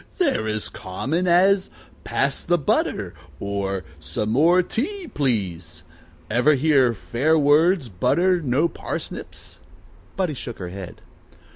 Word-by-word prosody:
"They're 285 - +1
as 110 -1 -2
common 145 - -3
as, 190 +3 +4 0.3
Pass 140 0 -1
the 175 0 +2
butter, 105 - 0 0.3
or, 100 -1 -3 0.2
Some 105 +6 -3
more 170 +9 +4
tea, 355 - -3
please. 90 - -2 0.4
Ever 125 - +3
hear, 135 -4 +3
Fair 145 +10 +1
words 155 +2 +4
butter 165 - +1
no 145 +3 +2
parsnips?" - - -7 0.6
Buddie 185 -5 -1
shook 120 -3 -7
her 90 -2 -6
head. 95 -1 -9
140 Hz, 120 wpm, -23 LUFS, 105-175 Hz, 0.6 s, as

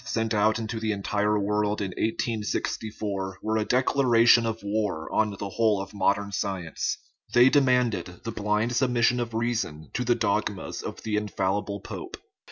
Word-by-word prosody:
sent 115 -2 -1
out 110 +1 +3
into 110 0 -4
the 110 -1 -1
entire 105 +1 0
world 105 +1 0
in 100 -2 -2
1864 105 -2 -2
were 110 +2 -1
a 110 - 0
declaration 120 -1 +4
of 115 -1 -4
war 100 -6 -1
on 110 0 +3
the 100 - -4
whole 110 -1 +2
of 95 +1 -7
modern 100 0 +1
science; 95 -4 -2 0.4
they 120 +2 +8
demanded 125 - +3 0.2
the 115 - -3
blind 105 +3 0
submission 125 -1 +2
of 115 -2 -3
rea 115 +2 +1
son 80 -9 -4
to 125 - -1
the 120 0 +2
dogmas - - -1
of - - -7
the 110 -1 -1
infallible 100 0 -1
pope. - - -7
110 Hz, 165 wpm, -26 LUFS, 100-115 Hz, 0.4 s, they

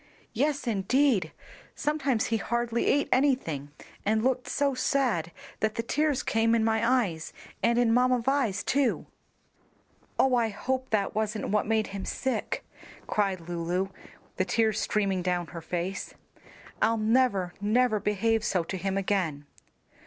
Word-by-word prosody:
"Yes, 285 -2 0
indeed; 225 - +2 0.4
sometimes 280 -6 0
he 225 - 0
hardly 235 +1 -1
ate 285 - +3
anything, 250 - +1 0.3
and 220 +1 +1
looked 255 0 0
so 280 -1 +1
sad 255 - 0 0.3
that 220 0 0
the 230 - -1
tears 295 +2 0
came 225 +1 +2
in 225 - +2
my 230 +3 +3
eyes, 160 -4 -6 0.3
and 235 0 +2
in 240 -2 +3
Mamma 250 +1 +4
Vi's 235 -5 0
too." 275 -3 +1 1.1
"Oh, 265 - +3
I 235 -2 +3
hope 260 +5 -3
that 210 -2 0
wasn't 215 -1 -2
what 210 +1 +1
made 220 -1 +2
him 195 -1 -4
sick!" 265 -1 -2 0.4
cried 195 -4 0
Lulu, 175 +3 -2 0.5
the 185 - +1
tears 220 +3 +1
streaming 195 -3 0
down 180 -1 0
her 165 - -6
face. 175 +3 -4 0.7
"I'll 225 +1 +3
never, 215 -5 +2
never 220 +1 +2
behave 215 +2 +1
so 185 -4 +1
to 190 - -5
him 195 +1 -2
again." 185 -7 -1
220 Hz, 145 wpm, -28 LUFS, 195-250 Hz, 1.1 s, Mamma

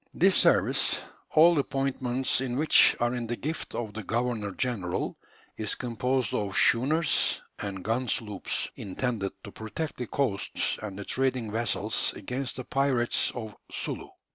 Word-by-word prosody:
This - - +5
service, - - +4 0.3
all 165 0 +6
appointments 135 -2 0
in 125 -2 -2
which 155 +2 +6
are 120 +1 +1
in 120 -2 -3
the 120 - -2
gift 155 +6 -5
of 110 -3 -4
the 110 - -5
governor 115 0 -1
general, 100 -6 -2 0.4
is 110 -2 -1
composed 125 +1 -1
of 100 -2 -1
schooners 145 +6 +3 0.2
and 95 -2 -5
gun 120 +4 0
sloops, 105 -3 -2
intended 100 0 -3
to 100 - -9
protect 115 +10 -5
the 125 - -4
coasts 125 -9 -1
and 100 -3 -6
the 100 - -6
trading 130 -4 0
vessels 110 -1 +1
against 125 +6 -4
the 130 - -5
pirates 135 -3 +1
of 110 -4 -6 0.2
Sulu. - - -4
120 Hz, 145 wpm, -28 LUFS, 105-130 Hz, 0.4 s, all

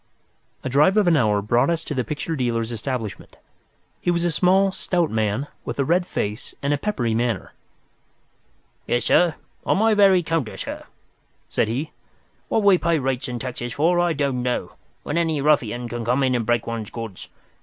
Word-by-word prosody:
A - - -3
drive 150 - +4
of 210 - +4
an 175 -2 +4
hour 105 -7 +2
brought 120 +8 +2
us 165 -1 0
to - - -4
the 130 -3 0
picture 150 +3 -3
dealer's 120 -4 -1
establishment. 115 -2 -5 0.7
He - - -1
was 170 0 +1
a 175 - +1
small, 190 +4 +3
stout 175 -3 -1
man 110 +4 0 0.2
with - - -5
a 140 - +1
red 175 +4 +2
face 105 +2 -4
and 140 +1 +1
a - - +1
peppery 130 - -1
manner. 115 -4 -1 1.3
"Yes, 120 - 0
sir. 175 -3 +4 0.3
On - - +1
my 220 +2 +4
very 195 -3 +5
counter, 160 -8 -2
sir," - - -6 0.6
said - - +1
he. 135 +8 -3 0.6
"What 220 - +1
we 195 -3 +5
pay 170 -1 +2
rates 135 -2 -2
and 125 -1 -4
taxes 120 -1 -5
for 170 +6 +2
I 175 -1 +2
don't 140 -4 -1
know, 125 0 -2 0.3
when 155 +3 -1
any 160 -3 0
ruffian 125 -5 +1
can 120 0 -4
come 125 +4 +1
in 130 -1 +2
and 120 -3 -1
break 120 -2 +1
one's 115 -2 -4
goods. 115 -5 -8
135 Hz, 185 wpm, -23 LUFS, 120-170 Hz, 1.3 s, very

